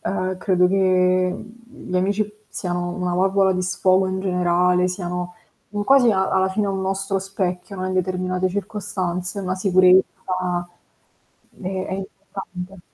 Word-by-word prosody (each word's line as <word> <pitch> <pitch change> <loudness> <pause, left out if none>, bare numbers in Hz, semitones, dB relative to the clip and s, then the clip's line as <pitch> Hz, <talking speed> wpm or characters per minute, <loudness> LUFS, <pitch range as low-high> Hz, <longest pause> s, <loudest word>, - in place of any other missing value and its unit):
ehm, 185 -1 -2
credo 180 -1 +3
che 185 -1 +2 0.2
gli 245 -7 -9
amici 200 +3 +2 0.2
siano 175 -1 -3
una 180 -1 -1
valvola 190 +1 +3
di 185 - -1
sfogo 185 +1 +2
in 190 0 -2
generale, 180 -1 +2
siano 180 -1 -4 0.4
un 205 0 -2
quasi 265 -3 +6
a 190 -2 +1
alla 190 0 +2
fine 205 +2 0
un 195 -1 -2
nostro 195 +1 -1
specchio, 190 0 -3
no, 185 0 -3
in 185 - -2
determinate 185 0 0
circostanze, 185 -2 -3
una 185 -1 -2
sicurezza 185 -1 +5 1.6
e 185 0 -3
è - - -5
importante. 195 -1 -8
185 Hz, 140 wpm, -22 LUFS, 180-195 Hz, 1.6 s, quasi